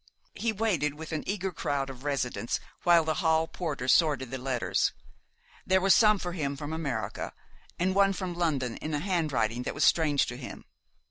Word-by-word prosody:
He 230 Hz, -, -1 dB
waited 185 Hz, -10 st, 0 dB
with 160 Hz, +2 st, -8 dB
an 155 Hz, -2 st, -2 dB
eager 195 Hz, -1 st, -2 dB
crowd 140 Hz, -4 st, -2 dB
of 130 Hz, 0 st, -12 dB
residents 135 Hz, -4 st, -1 dB, 0.2 s
while 170 Hz, -2 st, +5 dB
the 155 Hz, 0 st, 0 dB
hall 160 Hz, -1 st, +3 dB
porter 150 Hz, -7 st, -4 dB
sorted 140 Hz, -4 st, +3 dB
the 130 Hz, -, -4 dB
letters. 125 Hz, -2 st, 0 dB, 0.7 s
There 190 Hz, 0 st, +3 dB
were 195 Hz, +1 st, +3 dB
some 215 Hz, 0 st, +6 dB
for 180 Hz, -2 st, -4 dB
him 140 Hz, -5 st, -3 dB
from 150 Hz, +2 st, -5 dB
America, 140 Hz, -9 st, -3 dB, 0.4 s
and 185 Hz, +2 st, +1 dB
one 195 Hz, 0 st, +4 dB
from 185 Hz, -2 st, -4 dB
London 145 Hz, -9 st, -1 dB
in 155 Hz, 0 st, -3 dB
a -, -, 0 dB
handwriting 145 Hz, -, 0 dB
that -, -, -4 dB
was 145 Hz, -, 0 dB
strange 150 Hz, -4 st, +4 dB
to 125 Hz, -, -6 dB
him. 125 Hz, -, -9 dB
155 Hz, 185 wpm, -29 LUFS, 135-180 Hz, 0.7 s, some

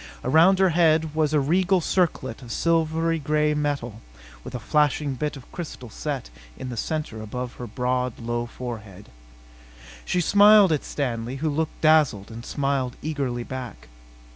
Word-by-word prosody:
Around 165 Hz, +8 st, +5 dB
her 190 Hz, 0 st, +4 dB
head 160 Hz, -2 st, +3 dB
was 155 Hz, -1 st, +1 dB
a 155 Hz, -, +3 dB
regal 185 Hz, +6 st, +2 dB
circlet 170 Hz, -9 st, -1 dB
of 120 Hz, -3 st, -9 dB
silvery 165 Hz, +1 st, +1 dB
gray 150 Hz, +1 st, +1 dB
metal 140 Hz, -7 st, -2 dB, 0.4 s
with -, -, -8 dB
a -, -, -3 dB
flashing 150 Hz, +2 st, +1 dB
bit 150 Hz, +2 st, -3 dB
of 130 Hz, -, -14 dB
crystal 135 Hz, -9 st, -7 dB
set 140 Hz, -, -4 dB, 0.3 s
in 130 Hz, -, -6 dB
the 120 Hz, -, -5 dB
center 150 Hz, -3 st, -3 dB
above 125 Hz, +3 st, -5 dB
her 120 Hz, -, -6 dB
broad, 125 Hz, +1 st, -1 dB
low 120 Hz, +1 st, -3 dB
forehead. 110 Hz, -6 st, -8 dB, 0.9 s
She 180 Hz, -, 0 dB
smiled 205 Hz, +1 st, +6 dB
at 150 Hz, -, 0 dB
Stanley 120 Hz, -3 st, -3 dB
who 155 Hz, +3 st, -1 dB
looked 160 Hz, +2 st, -3 dB
dazzled 150 Hz, -10 st, +3 dB
and 115 Hz, +1 st, -8 dB
smiled 135 Hz, -2 st, -1 dB
eagerly 140 Hz, -6 st, -2 dB
back. 120 Hz, -, -8 dB
145 Hz, 155 wpm, -24 LUFS, 120-160 Hz, 0.9 s, smiled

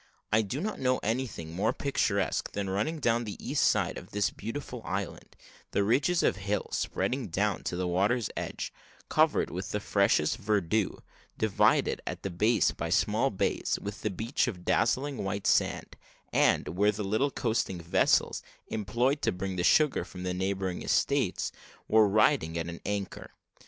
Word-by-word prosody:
I 110 Hz, -, +5 dB
do 110 Hz, +6 st, -3 dB
not 215 Hz, +2 st, -3 dB
know 130 Hz, -1 st, +2 dB
anything 110 Hz, -8 st, -3 dB
more 95 Hz, +4 st, +1 dB
picturesque 100 Hz, -, 0 dB
than 100 Hz, -1 st, -2 dB
running 105 Hz, +12 st, -1 dB
down 120 Hz, -3 st, +2 dB
the 105 Hz, -3 st, -6 dB
east -, -, 0 dB
side -, -, +2 dB
of -, -, -14 dB
this 105 Hz, 0 st, 0 dB
beautiful 120 Hz, +2 st, -6 dB
island 95 Hz, 0 st, -5 dB, 0.4 s
the 100 Hz, -, +2 dB
ridges 140 Hz, -, +2 dB
of -, -, +2 dB
hill 100 Hz, +1 st, -2 dB
spreading 130 Hz, -3 st, -1 dB
down 100 Hz, +4 st, 0 dB
to -, -, -2 dB
the 90 Hz, 0 st, -1 dB
water's 100 Hz, +6 st, +1 dB
edge, -, -, -4 dB, 0.4 s
covered -, -, +3 dB
with 90 Hz, +2 st, -4 dB
the 105 Hz, -, -1 dB
freshest 100 Hz, -3 st, +2 dB
verdure, 105 Hz, -1 st, 0 dB, 0.3 s
divided 110 Hz, -3 st, +2 dB
at -, -, -5 dB
the 95 Hz, -, -3 dB
base 110 Hz, +7 st, +3 dB
by -, -, -4 dB
small -, -, +2 dB
bays, -, -, -1 dB
with 100 Hz, 0 st, -6 dB
the 110 Hz, -, 0 dB
beach 115 Hz, +8 st, -1 dB
of 90 Hz, -7 st, -5 dB
dazzling 135 Hz, +4 st, +1 dB
white 95 Hz, 0 st, -3 dB
sand, -, -, +1 dB, 0.4 s
and -, -, +3 dB
where 100 Hz, +5 st, +2 dB
the 105 Hz, 0 st, -4 dB
little 110 Hz, +8 st, +1 dB
coasting 110 Hz, -8 st, -1 dB
vessels, 85 Hz, +1 st, +2 dB, 0.3 s
employed 120 Hz, +7 st, 0 dB
to -, -, +2 dB
bring 95 Hz, +1 st, -4 dB
the 90 Hz, -, -1 dB
sugar 150 Hz, -, +4 dB
from 90 Hz, -1 st, -9 dB
the 90 Hz, 0 st, -1 dB
neighbouring 95 Hz, -1 st, -2 dB
estates, -, -, +1 dB, 0.4 s
were 110 Hz, -1 st, +5 dB
riding 105 Hz, -, +3 dB
at 85 Hz, -, -2 dB
an 85 Hz, -1 st, -7 dB
anchor. 100 Hz, -1 st, -4 dB
105 Hz, 165 wpm, -29 LUFS, 95-120 Hz, 0.4 s, I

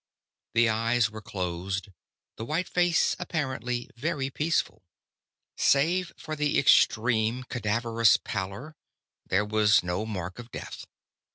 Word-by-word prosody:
The 115 Hz, 0 st, +5 dB
eyes 115 Hz, 0 st, +1 dB
were 110 Hz, 0 st, -8 dB
closed; 95 Hz, -1 st, -4 dB, 0.5 s
the 110 Hz, -, -6 dB
white 160 Hz, +9 st, -2 dB
face 175 Hz, -1 st, +2 dB
appeared 145 Hz, -9 st, -3 dB, 0.3 s
very 135 Hz, +1 st, -2 dB
peaceful. 160 Hz, +5 st, -1 dB, 0.8 s
Save 170 Hz, +6 st, +2 dB
for 155 Hz, -, -6 dB
the 150 Hz, -1 st, 0 dB
extreme, 115 Hz, -1 st, +3 dB
cadaverous 115 Hz, -1 st, +2 dB
pallor, 100 Hz, +10 st, -5 dB, 0.5 s
there 105 Hz, +3 st, +1 dB
was 105 Hz, -1 st, +3 dB
no 90 Hz, +5 st, -2 dB
mark 95 Hz, -2 st, -5 dB
of 120 Hz, 0 st, -9 dB
death. -, -, -8 dB
115 Hz, 115 wpm, -27 LUFS, 105-140 Hz, 0.8 s, The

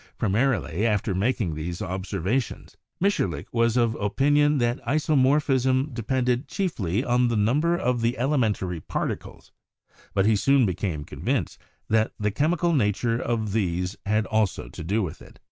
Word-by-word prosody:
Primarily, 105 Hz, -, 0 dB
after 105 Hz, -2 st, 0 dB
making 100 Hz, -2 st, 0 dB
those 85 Hz, +4 st, -5 dB
observations, 95 Hz, +4 st, -3 dB, 0.2 s
Mitscherlich 100 Hz, -, 0 dB
was 115 Hz, 0 st, +2 dB
of 115 Hz, -2 st, +2 dB
opin 135 Hz, +8 st, +1 dB
ion 145 Hz, 0 st, +4 dB
that 120 Hz, 0 st, 0 dB
isomorphism 135 Hz, -2 st, +2 dB
depended 125 Hz, +2 st, 0 dB
chiefly 115 Hz, -, -1 dB
on 125 Hz, -1 st, +2 dB
the 120 Hz, -, 0 dB
number 145 Hz, +12 st, +2 dB
of 125 Hz, -6 st, 0 dB
the 115 Hz, +2 st, 0 dB
elementary 110 Hz, -, 0 dB
particles, -, -, -5 dB, 0.6 s
but 95 Hz, -1 st, +3 dB
he 110 Hz, 0 st, +4 dB
soon 135 Hz, +5 st, +3 dB
became 90 Hz, -5 st, -2 dB
convinced -, -, -3 dB, 0.3 s
that 110 Hz, 0 st, +1 dB
the 105 Hz, 0 st, 0 dB
chemical 165 Hz, -, +1 dB
nature 115 Hz, -2 st, +1 dB
of 110 Hz, -3 st, -1 dB
these 90 Hz, -3 st, -1 dB
had 110 Hz, +1 st, +2 dB
also 110 Hz, -3 st, -1 dB
to -, -, -8 dB
do 100 Hz, +6 st, 0 dB
with 80 Hz, -, -6 dB
it. -, -, -15 dB
115 Hz, 145 wpm, -25 LUFS, 100-130 Hz, 0.6 s, ion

